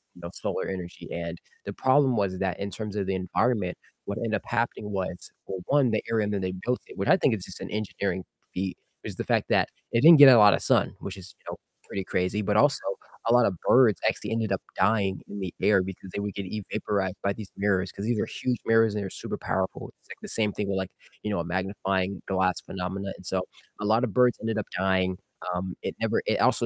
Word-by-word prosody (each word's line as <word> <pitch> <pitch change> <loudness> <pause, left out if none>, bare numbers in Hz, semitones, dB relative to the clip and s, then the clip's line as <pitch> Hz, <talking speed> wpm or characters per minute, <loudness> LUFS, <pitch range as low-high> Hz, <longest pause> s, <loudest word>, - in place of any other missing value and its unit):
you 90 - -14
know, 85 - -6
solar - - -3
energy, 90 -2 -6
and 85 0 -4 0.3
the - - -4
problem 130 -1 +3
was 95 -2 0
that 95 -2 -1
in 100 - -3
terms 105 +1 -5
of 100 - 0
the 95 - 0
environment, 95 +1 0 0.3
what 100 - -4
ended 115 -2 -2
up - - -2
happening 115 -3 -1
was, 95 -2 -4
well, 95 - -5
1, 140 -4 +4
the 110 - 0
area 110 -2 +2
that 100 -1 -1
they 95 0 -1
built 125 +1 0
it - - -12
which 100 - -1
I - - +7
think 135 -10 +3
is 95 - -7
just 90 - -10
an - - -5
engineering 100 -3 -2 0.3
feat, 95 0 -2 0.3
is - - -5
the - - -3
fact - - +1
that - - +3 0.2
it 115 - +3
didn't 165 +1 +10
get 135 -3 +11
a - - +7
lot 105 -2 +8
of - - -4
sun, - - +2
which - - -6
is, 90 -1 -10
you - - -33
know, - - -5 0.3
pretty 95 - -3
crazy, 90 +3 0
but 105 0 +1
also 140 +4 +4 0.5
a 115 - +4
lot 125 - +6
of 95 - +1
birds 120 -5 +5
actually 105 - -1
ended 110 -2 0
up 95 - 0 0.2
dying 100 -2 +2
in 100 - -6
the 95 -3 -4
air 100 -2 +5
because 95 0 -8
they - - -2
would 100 -1 -3
get 100 - -4
evaporated 100 -1 -2
by 100 - +2
these 105 -2 -9
mirrors, 95 -2 +1
'cause 100 - -7
these 115 -1 +1
are - - +1
huge 125 -2 -2
mirrors 115 -1 +4
and 105 - -1
they're 95 - -4
super - - -5
powerful, 95 0 -2
it's - - -30
like - - -9
the - - -7
same 105 -2 +1
thing 100 0 -3
with 100 -1 -1
like, 95 -1 -3 0.3
you 105 - -2
know, 100 - 0
a 85 - -2
magnifying 95 +1 -1
glass 95 -2 +1
phenomena, 95 +1 -4
and 95 - -14
so 95 +1 0 0.4
a - - -2
lot 110 +3 +3
of 115 -6 -1
birds 125 -1 +4
ended 110 0 -1
up 110 - -1
dying, 95 0 +2 0.4
um, 90 0 -3
it - - -3
never - - +1
it - - +2
also - - +3
100 Hz, 245 wpm, -27 LUFS, 95-110 Hz, 0.5 s, get